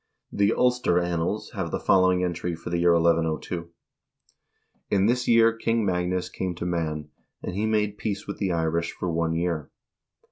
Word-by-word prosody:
The 100 +1 +2
"Ulster 125 -8 +2
Annals" 85 +3 -2
have 95 -6 -3
the - - -2
follow 95 -1 +4
ing 90 0 +1
entry 85 -1 -2
for 85 +1 -8
the 85 - 0
year 85 0 +4
1102: 85 0 0 1.2
"In 100 -1 +3
this 120 +2 +1
year 115 -1 +5
King 115 -1 0
Magnus 90 -1 0
came 90 -1 -4
to 85 - -5
Man, 80 -4 -2 0.3
and - - -4
he 105 +2 0
made 105 -1 0
peace 100 -1 -3
with 100 - -6
the 95 -3 0
Irish 85 0 -1
for 90 - -3
one 80 0 0
year." 85 -3 -2
90 Hz, 175 wpm, -25 LUFS, 85-100 Hz, 1.2 s, year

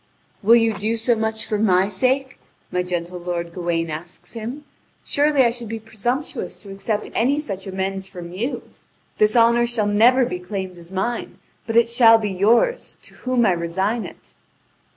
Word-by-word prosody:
"Will 225 +3 +6
you 225 -1 +3
do 215 +3 -1
so 230 +1 +2
much 220 0 -2
for 210 - -2
my 190 -3 +3
sake?" 255 +6 -1 0.3
my 180 - 0
gentle 180 0 -4
lord 170 -1 -4
Gawain 170 -2 -2
asks 170 +3 -8
him; 240 +6 -6 0.4
"surely 290 -1 +3
I 235 - +3
should 235 -2 -6
be 225 - -3
presumptuous 240 +5 -4
to 200 - -12
accept 205 +2 -3
any 270 +5 +2
such 200 -11 -5
amends 190 0 -3
from 175 -2 -9
you. 235 +9 -3 0.6
This 215 +1 +3
honour 235 +1 +4
shall 235 -3 0
never 235 +5 +4
be 180 -5 -4
claimed 185 -1 -6
as 170 +1 -14
mine, 230 +6 -3 0.3
but 225 - -2
it 235 0 +5
shall 235 -1 +6
be 210 -2 -2
yours, 230 - +2
to - - -9
whom 255 -2 0
I 195 - +4
resign 190 +6 -1
it." - - -16
215 Hz, 175 wpm, -22 LUFS, 185-235 Hz, 0.6 s, Will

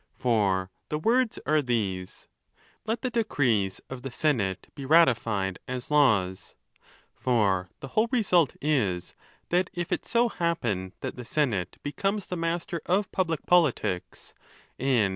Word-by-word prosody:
For 100 -6 +1 0.2
the 150 - -1
words 235 +7 +2
are 155 0 +3
these,—Let 115 - -5
the 255 - -1
decrees 125 - +1
of 130 -1 -7
the 135 - -5
senate 120 -9 0
be 140 - -8
ratified 115 - +3
as 125 +2 -5
laws. 100 -11 +2 0.6
For 100 -7 +1
the 135 - -6
while 220 - +2
result 185 - +2
is, 105 -13 0 0.4
that 180 +2 +2
if 175 -1 -3
it - - 0
so 235 +1 +3
happen 120 - -2
that - - -5
the 125 - -6
senate 115 - -1
becomes 195 +7 -1
the 180 - -4
master 165 0 -2
of 190 +2 +1
public 165 -5 -1
politics, 125 - +1 0.5
and. 125 -6 +2
135 Hz, 135 wpm, -27 LUFS, -, 0.6 s, are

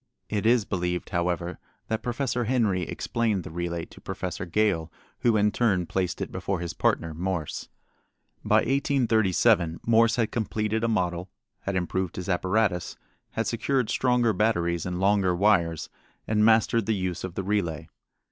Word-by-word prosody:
It 105 0 0
is 120 -3 +4
believed, 90 -1 -2
however, 85 -1 -1 0.3
that 110 - -1
Professor 120 -1 -1
Henry 110 -6 +1
explained 105 +2 -1
the - - -8
relay 85 0 -3
to - - -16
Professor 90 0 -4
Gale, 85 -4 +1 0.3
who 115 -3 +3
in 105 0 +3
turn 100 -6 +1
placed 90 0 -2
it - - -3
before 95 -3 -2
his 85 -1 -4
partner, 80 -1 0
Morse. 85 -1 -3 0.7
By - - +4
1837 115 - +2
Morse 115 0 +4
had 115 -3 0
completed 110 -1 -1
a - - +3
model, 90 -4 -1 0.3
had 100 - -3
improved 95 0 -1
his 90 +1 -5
apparatus, 95 0 0 0.4
had 115 - -1
secured 125 +1 0
stronger 125 -3 +2
batteries 85 -5 +1
and 90 0 -3
longer 95 -2 +3
wires, 85 -4 +2 0.4
and 105 -1 +2
mastered 115 0 +4
the 110 - +2
use 90 -3 -3
of 95 -1 -5
the 95 - -2
relay. 95 -6 -1
100 Hz, 155 wpm, -26 LUFS, 90-115 Hz, 0.7 s, is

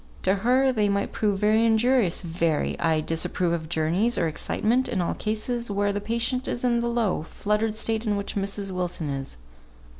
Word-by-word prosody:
To 190 - +3
her, 255 +5 +3
they 210 -4 +1
might 200 0 0
prove 205 -2 0
very 215 +3 +3
injurious, 225 -4 +2
very. 165 -2 0
I 160 -2 +2
disapprove 170 +2 0
of 160 -2 -3
journeys, 175 +9 +1
or 165 - +2
excitement, 230 - 0
in 205 - -1
all 175 - 0
cases 225 +2 -2
where 205 0 0
the 205 - -2
patient 235 +4 -1
is 240 - -3
in 240 -1 +2
the 235 - -1
low, 235 -8 0
fluttered 210 +6 -1
state 220 +1 -2
in 205 -1 +1
which 200 - -4
Mrs. 200 0 -3
Wilson 180 -4 -3
is. 135 - -5
205 Hz, 185 wpm, -25 LUFS, 175-230 Hz, -, To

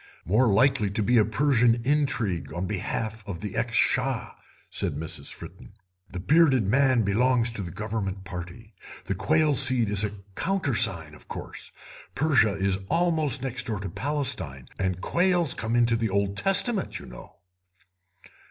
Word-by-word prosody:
"More 110 +6 +2
likely 130 0 +2
to 105 +2 -1
be 120 +3 +3
a 105 - +4
Persian 120 -1 +2
intrigue 130 - 0
on 90 +2 -3
behalf 110 +3 -4
of 90 -4 -6
the 105 -2 -6
ex 115 +1 -2
Shah," 130 -1 0 0.4
said - - -2
Miss 80 +1 -4
Fritten; - - -11 0.4
"the 90 - -7
bearded 135 - +3
man 130 +1 +3
belongs 120 +3 +1
to 115 - -5
the 90 - -6
Government 100 0 -5
Party. 90 +4 -9 0.3
The - - -2
quail 150 - +1
seed 130 -5 +4
is 105 0 +3
a 105 -1 -2 0.2
countersign, 110 - 0
of 75 - -15
course; - - -8 0.4
Persia 130 -10 +2
is 95 -1 -1
almost 160 -6 +1
next 130 -1 -3
door 110 -4 -3
to 100 -1 -5
Palestine, 95 - -2
and 95 -1 -2
quails 175 - +1
come 115 +1 -3
into 120 -1 +3
the 115 -1 -1
Old 100 0 -1
Testament, 195 - +4
you - - -11
know." - - -13
115 Hz, 155 wpm, -25 LUFS, 100-135 Hz, 0.4 s, a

